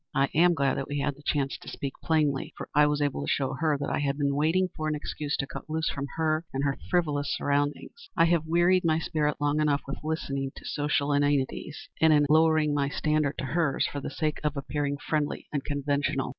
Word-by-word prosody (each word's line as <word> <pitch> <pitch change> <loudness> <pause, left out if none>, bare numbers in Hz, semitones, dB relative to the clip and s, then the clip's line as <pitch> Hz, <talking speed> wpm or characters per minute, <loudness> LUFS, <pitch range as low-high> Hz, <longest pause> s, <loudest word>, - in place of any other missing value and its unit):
I 135 0 +3
am 175 +2 +5
glad 140 -2 +1
that 135 - -3
we 145 - -3
had 145 0 0
the 145 - -16
chance 140 -2 -1
to - - -15
speak 140 -1 -5
plainly, 150 -4 +1
for - - -6
I 150 0 +5
was 150 0 +1
able 140 - -1
to 70 - -3
show 135 -2 0
her 155 +1 +1
that 140 +1 -3
I - - 0
had 140 -1 -1
been 140 -1 +1
waiting 165 +6 +2
for 155 - -3
an 155 - 0
excuse 150 0 -3
to 135 - -1
cut 135 - -9
loose 160 +1 0
from 140 0 -4
her 155 0 +1
and 135 +1 -2
her 140 -1 0
frivolous 150 -5 +1
surroundings. 145 - -2
I 165 - +6
have 165 -2 +1
wearied 175 +2 +3
my 160 -2 +3
spirit 150 -2 -1
long 145 +1 +1
enough 145 -2 +1
with 140 - -6
listening 140 -4 -2
to - - -12
social 145 -1 0
inanities, 145 +1 0
and 160 0 +6
in 150 -1 +5
lowering 155 -1 +4
my 140 -1 +1
standards 150 -1 0
to - - -3
hers 150 0 +1
for 145 - -4
the - - -4
sake 155 0 -2
of 150 -1 -1
appearing 145 0 -2
friendly 150 0 -2
and 145 -2 -1
conventional. 145 -1 -1
145 Hz, 225 wpm, -27 LUFS, 140-155 Hz, -, I